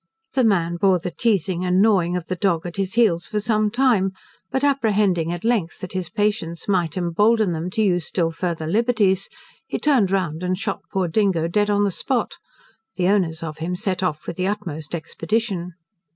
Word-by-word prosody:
The 260 - +2
man 175 -6 +2
bore 190 0 +4
the 180 +1 -5
teazing 185 -3 0
and 180 0 +2
gnawing 190 -5 +3
of 175 - -5
the 185 - -3
dog 175 -3 0
at 175 +1 -6
his 195 +1 -2
heels 190 -8 +3
for 210 - -1
some 215 0 +1
time, 220 -5 +2 0.4
but 265 - -1
apprehending 210 - +2
at 175 0 -5
length, 220 -8 0
that 185 - -7
his 185 -3 -3
patience 190 -4 -2
might 180 -4 0
embolden 205 +4 +2
them 165 +2 -3
to 220 +4 0
use 175 -4 +1
still 165 -3 0
farther 165 -1 -3
liberties, 205 0 +1 0.4
he - - -2
turned 265 -10 +3
round 180 -5 -1
and 180 0 -1
shot 200 -1 -3
poor 190 -3 0
Dingo 170 -2 +1
dead 205 +4 +1
on 205 0 +2
the 200 - +1
spot: 255 - -2 0.6
the 180 0 +1
owners 170 -6 +1
of 155 -1 -6
him 175 +3 -2
set 190 -1 -2
off 155 -5 -2
with - - -6
the 185 0 0
utmost 175 -7 -4
expedition. 180 +2 -2
185 Hz, 195 wpm, -22 LUFS, 170-210 Hz, 0.6 s, bore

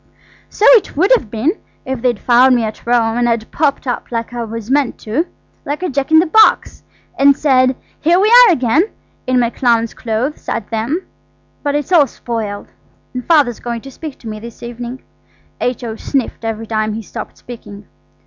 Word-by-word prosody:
"So 420 - -1
it 460 - +4
would 375 +9 +3
have 235 - -4
been, 230 +9 0 0.3
if 260 -2 -4
they'd 245 -2 +1
found 250 +4 +4
me 240 - +1
at 220 +1 -6
Rome, 235 -1 +2
and 240 0 +2
I'd 230 -1 -2
popped 285 -3 0
up 245 -1 -4
like 230 0 -3
what 235 -2 -5
I 215 - -14
meant 280 -3 +1
to–like 290 +4 -5
a 365 - -1
jack 275 0 -2
in 315 - +6
the 330 - +5
box–and 315 -7 +2
said, 255 -3 +3 0.2
'Here 340 +4 +3
we 410 - +3
are 480 -1 +8
again!' 290 - +2 0.4
in 255 0 +2
my 235 -1 +1
clown's 230 -3 +1
clothes, 240 +6 -3
at 220 - -4
them. 235 +11 -2 0.6
But 285 -1 -1
it's 295 +4 -2
all 315 -6 +5
spoiled, 220 -4 -5 0.4
and 250 -1 -4
father's 290 -8 +3
going 235 -1 -4
to 270 - -11
speak 300 +1 -8
to 230 - -10
me 215 -1 -6
this 235 +1 -11
evening." 240 +2 -7 0.6
H.O. 240 -2 -3
sniffed 265 -2 -3
every 225 0 -3
time 215 -1 -1
he 225 - -5
stopped - - -8
speaking. 210 -4 -11
245 Hz, 185 wpm, -16 LUFS, 230-290 Hz, 0.6 s, are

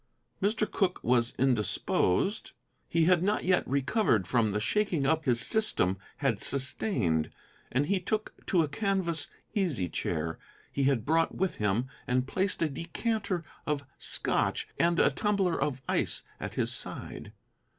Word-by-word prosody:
Mr. 215 +2 +1
Cooke 190 -3 -1
was 120 -1 +1
indisposed. 125 - 0 0.4
He 165 -1 +2
had 180 -1 +4
not 205 +3 0
yet 185 0 +2
recovered 140 - +1
from 110 +1 +1
the 105 - -1
shaking 165 - 0
up 160 +2 +1
his 120 -3 +3
system 95 - +3 0.2
had 135 -8 -1
sustained, 125 - +3 0.4
and 135 +3 +1
he 195 +4 +1
took 215 +4 -3
to 175 -3 +3
a - - -1
canvas 175 -2 0 0.3
easy 170 - 0
chair 80 -1 -3 0.3
he 140 - 0
had 130 -5 +1
brought 165 +2 +1
with 190 0 -1
him 105 +3 0 0.2
and 125 +1 +1
placed 190 +2 0
a - - +2
decanter 185 - -3 0.2
of 145 -2 -1
Scotch - - +1
and 170 0 +2
a - - +4
tumbler 200 -5 0
of 135 -3 -2
ice - - +1 0.2
at - - -6
his - - 0
side. 100 - -4
150 Hz, 150 wpm, -29 LUFS, 120-190 Hz, 0.4 s, had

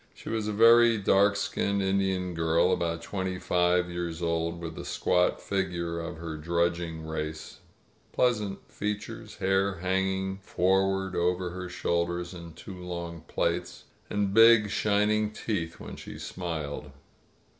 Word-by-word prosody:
She - - -9
was 110 -2 -1
a - - 0
very 115 +2 +6
dark 100 0 +4
skinned 100 0 0
Indian 95 -2 0
girl, 80 +2 +2
about 85 -1 -1
twenty 95 0 -3
five 90 0 +2
years 85 -1 -4
old, 85 0 -1
with 85 -1 -5
the - - -7
squat 90 0 +1
figure 85 -4 -2
of 85 0 -5
her 80 -1 -6
drudging 85 0 -1
race, 80 0 -5 0.5
pleasant 105 -6 0
features, 105 +2 -5
hair 95 0 +1
hanging 95 +1 -1
forward 95 0 +1
over 90 +1 0
her 90 0 -6
shoulders 85 0 -1
in 85 -2 -9
two 95 +3 -10
long 85 -2 -5
plaits, - - -2 0.3
and 100 -1 0
big, 115 -1 +7
shining 105 0 +2
teeth 100 -6 -3
when - - -8
she - - -9
smiled. 75 -5 -5
90 Hz, 135 wpm, -28 LUFS, 85-100 Hz, 0.5 s, big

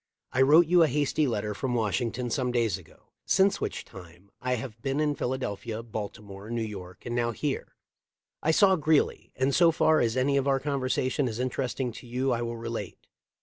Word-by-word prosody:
I 130 - +2
wrote 155 +6 +7
you 175 +2 +4
a 160 - +6
hasty 145 +2 +1
letter 105 -3 -2
from 125 +4 -2
Washington 120 +2 -1
some 125 +1 0
days 115 -6 +1
ago, 90 -4 -15
since 195 +1 +3
which - - -3
time 90 0 -14
I 125 0 0
have 115 -2 -7
been 135 +3 -1
in 150 -1 +2
Philadelphia, 120 -4 -3
Baltimore, 105 -2 -7
New 115 -1 -1
York, 95 -4 -8
and 120 0 -3
now 120 -1 +1
here. 135 +4 -3 0.7
I 155 - 0
saw 190 +4 +5
Greeley, 155 -1 +1
and 130 +2 +1
so 170 +2 +5
far 160 -1 +3
as 115 +1 +1
any 140 +2 +2
of 135 0 +1
our 135 -1 +3
conversation 135 -1 0
is 110 -2 -4
interesting 130 0 -2
to 120 - -11
you 130 +2 0
I 120 -1 0
will 120 0 -3
relate. 115 -4 -6
125 Hz, 190 wpm, -28 LUFS, 110-140 Hz, 0.7 s, wrote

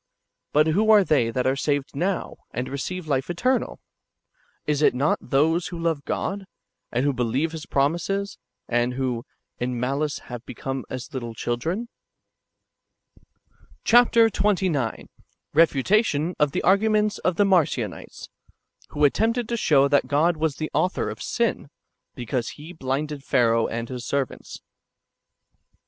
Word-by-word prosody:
But 150 +1 +4
who 200 +8 +2
are 210 -2 +7
they 140 -10 +2
that 125 +2 -1
are 130 +1 +2
saved 145 0 -1
now, 180 +5 -2
and 125 +1 -4
receive 160 +5 -5
life 135 -1 0
eternal? 250 +9 0 0.9
Is 150 -1 0
it 150 - +4
not 140 +4 +1
those 160 +6 +1
who 175 - -6
love 165 -4 -1
God, 195 0 -3 0.4
and 125 +3 0
who 145 - +2
be 125 - -3
lieve 135 +8 0
His 160 -2 -7
promises, 175 +8 -1 0.3
and 120 +1 0
who 130 -2 -1
"■ 115 - -8 0.4
in 125 0 -2
malice 140 +4 -1
have 120 -1 -9
become 135 +1 -5
as 130 -1 -7
little 120 -3 -5
children?" 165 - -2 1.3
2 - - -33 0.6
Chap. 240 +1 +5
XXIX. 195 - +2 0.3
— - - -48
Refutation 165 - +3
of 150 -2 +3
the - - -2
arguments 210 +3 +3
of 180 - 0
tlie 205 +2 +3
Marcionites, 140 - 0 0.6
loho 150 0 +2
attempted 225 - +1
to - - -2
sJioiv 140 -11 +3
that 145 - +3
God 160 +4 +2
icas 155 -2 -1
the 155 - -4
author 185 - 0
of - - -9
sin, 230 -11 -1 0.5
because 120 0 -3
He 155 +4 -10
blinded 145 -1 -3
Pharaoh 115 -3 +2
and 115 +1 -4
his 125 -1 -6
servants. 140 -2 -4
150 Hz, 150 wpm, -24 LUFS, 130-185 Hz, 1.3 s, are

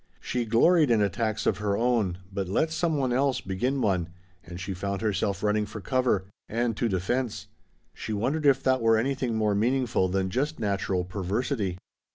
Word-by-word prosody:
She 125 -1 -2
gloried 150 +8 +4
in 115 -2 +4
attacks 105 +1 0
of 95 - +1
her 100 -1 0
own, 115 -7 +1 0.2
but 95 -1 -2
let 155 +11 +1
some 165 -1 0
one 130 -3 0
else 135 0 +2
begin 125 +9 -1
one 90 -6 +1 0.3
and 85 -1 -9
she 95 +1 -4
found 100 +2 -3
herself 100 -2 -1
running 105 0 +1
for 105 - -7
cover 120 -2 +1 0.2
and 115 0 0
to 120 - 0
defense. 110 +6 -1 0.5
She - - -6
wondered 135 +9 0
if 135 -1 +4
that 130 -1 +2
were 115 -1 +4
anything 130 0 -1
more 105 -2 +1
meaningful 120 -1 +1
than 95 0 -1
just 145 +8 -1
natural 100 -3 0
perversity. 100 +2 -2
110 Hz, 180 wpm, -27 LUFS, 100-130 Hz, 0.5 s, gloried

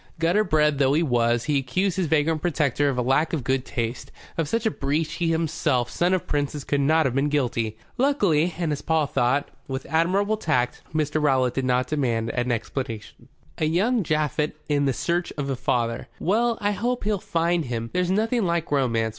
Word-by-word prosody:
Gutter 170 +6 +2
bred 150 -5 +2
though 135 -1 +3
he 160 +3 +3
was, 120 -4 +1
he 145 -2 +1
accused 170 +8 -1
his 185 -3 0
vagrant 155 0 +1
protector 145 -4 +1
of 130 - -2
a 125 - +1
lack 135 +7 +1
of 150 -6 -1
good 130 0 0
taste. 120 +2 -4 0.2
Of 160 -3 -1
such 230 +4 -1
a 220 - +3
breach 155 +2 -1
he 170 -2 -1
himself, 160 -6 0
son 180 +2 +2
of 185 - -3
princes, 145 -1 -2
could 145 0 0
not 155 +2 +3
have 130 - 0
been 140 +2 +1
guilty. 120 -6 -1 0.2
Luckily, 195 - +2
and, 170 -3 -1
as 145 - -2
Paul 160 -2 +1
thought, 140 +1 0 0.2
with 135 0 -4
admirable 195 +6 +1
tact, 125 - 0
Mr. 155 0 0
Rowlatt 130 -4 +2
did 135 - -1
not 125 0 +2
demand 120 -6 -1
explanation. 120 -1 -4 0.3
"A 155 - +1
young 205 +9 +2
Japhet 150 -1 0
in 145 -2 +2
search 170 +6 -1
of 140 -1 -2
a - - 0
father. 120 -3 -1
Well, 230 +5 +1
I 205 -2 +1
hope 240 +5 -2
he'll 205 -1 0
find 170 0 0
him. 115 -2 -4
There's 180 -1 +1
nothing 220 +4 +1
like 170 -3 -1
romance. 115 -5 +1
150 Hz, 195 wpm, -24 LUFS, 130-170 Hz, 0.3 s, though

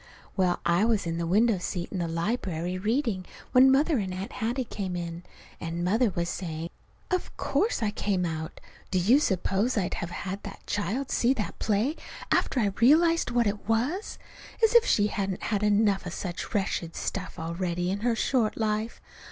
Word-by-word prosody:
Well, 185 -3 +1
I 170 +3 +3
was 220 -4 +2
in 165 0 -2
the 170 - -1
window 210 +3 +3
seat 175 -1 -4
in 190 - -3
the 170 - -1
library 170 0 -2
reading 220 -2 0 0.3
when 260 +1 +7
Mother 290 +1 +3
and 190 -3 -3
Aunt 195 +6 -5
Hattie 245 +2 -1
came 195 -6 -4
in; 170 -1 -4 0.4
and 170 +1 -3
Mother 220 +6 +3
was 170 0 0
saying: 165 -2 -4 0.4
"Of 365 -1 -2
course 425 - 0
I 210 - +1
came 195 -3 0
out! 160 -1 -4 0.3
Do 185 - 0
you 220 +10 +5
suppose 200 - 0
I'd 190 -3 0
have 170 - -3
had 195 +2 -5
that 200 - -10
child 210 +7 -2
see 250 +3 +3
that 215 -5 -4
play, 220 +9 +1 0.3
after 260 - +2
I 205 -4 +1
realized 330 +6 +5
what 240 -1 +2
it 205 +1 -3
was? 265 - 0 0.5
As 450 - +5
if 475 0 +7
she 205 - +4
hasn't 195 -2 -2
had 205 -2 0
enough 205 -2 +2
of 175 - -5
such 175 -2 -5
wretched 180 -4 -1
stuff 190 -2 -4
already 175 +1 -2
in 200 - -2
her 235 +2 +1
short 225 -1 +1
life! 220 +1 -1
205 Hz, 185 wpm, -27 LUFS, 180-235 Hz, 0.5 s, when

